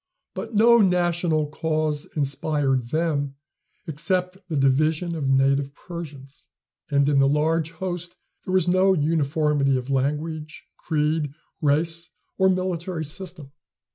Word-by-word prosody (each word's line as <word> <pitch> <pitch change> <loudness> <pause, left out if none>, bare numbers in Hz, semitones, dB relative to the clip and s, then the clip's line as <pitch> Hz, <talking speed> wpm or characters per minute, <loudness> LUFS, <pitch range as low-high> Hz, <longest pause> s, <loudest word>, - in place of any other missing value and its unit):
But 230 - -6
no 235 +3 +6
national 175 -5 +2
cause 155 -2 -1
inspired 140 -2 0
them 145 -3 -1 0.5
except 180 +4 -1
the 160 - -2
division 155 +5 +2
of 140 -4 -2
native 135 +1 +2
Persians; 145 -6 -9 0.4
and 140 -1 +3
in 145 -1 +3
the 135 - +5
large 155 +2 +1
host 175 +1 -5 0.3
there 185 - -4
was 185 -3 +3
no 185 +2 +4
uniformity 150 -3 +1
of 130 +2 -5
language, 150 +3 -2
creed, 150 -1 -1 0.3
race 165 +3 +1 0.3
or 190 0 +5
military 180 -2 -2
system. 160 -2 -7
155 Hz, 120 wpm, -24 LUFS, 140-175 Hz, 0.5 s, no